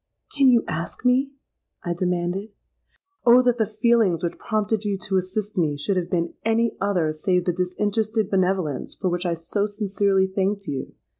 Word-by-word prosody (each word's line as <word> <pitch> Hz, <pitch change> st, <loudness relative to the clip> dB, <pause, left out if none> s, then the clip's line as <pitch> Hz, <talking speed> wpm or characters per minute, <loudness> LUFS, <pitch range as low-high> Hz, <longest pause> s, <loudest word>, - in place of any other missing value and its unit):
'—'Can 275 Hz, -2 st, +5 dB
you 240 Hz, -2 st, +4 dB
ask 170 Hz, +9 st, -5 dB
me?' 260 Hz, +2 st, +3 dB, 0.5 s
I 175 Hz, -, -1 dB
demanded. 180 Hz, +3 st, -2 dB, 0.7 s
'Oh! 245 Hz, +1 st, +7 dB
that 245 Hz, -1 st, +2 dB
the 220 Hz, -, +2 dB
feelings 215 Hz, -6 st, +2 dB
which 170 Hz, -, -3 dB
prompted 215 Hz, -1 st, -1 dB
you 205 Hz, -2 st, -1 dB
to 190 Hz, 0 st, -1 dB
assist 190 Hz, +2 st, -2 dB
me, 150 Hz, -4 st, +1 dB
should 170 Hz, +7 st, -1 dB
have 180 Hz, -2 st, -1 dB
been 170 Hz, -1 st, -1 dB
any 225 Hz, +1 st, +1 dB
other 180 Hz, -6 st, +1 dB
save 180 Hz, +3 st, 0 dB
the 180 Hz, -, +1 dB
disinterested 205 Hz, +4 st, -1 dB
benevolence 185 Hz, -7 st, -1 dB
for 185 Hz, -, -1 dB
which 175 Hz, +1 st, -1 dB
I 170 Hz, -, 0 dB
so 185 Hz, +5 st, -1 dB
sincerely 200 Hz, -2 st, +1 dB
thanked 195 Hz, +1 st, -1 dB
you!' 140 Hz, -5 st, -5 dB
195 Hz, 170 wpm, -23 LUFS, 175-215 Hz, 0.7 s, Oh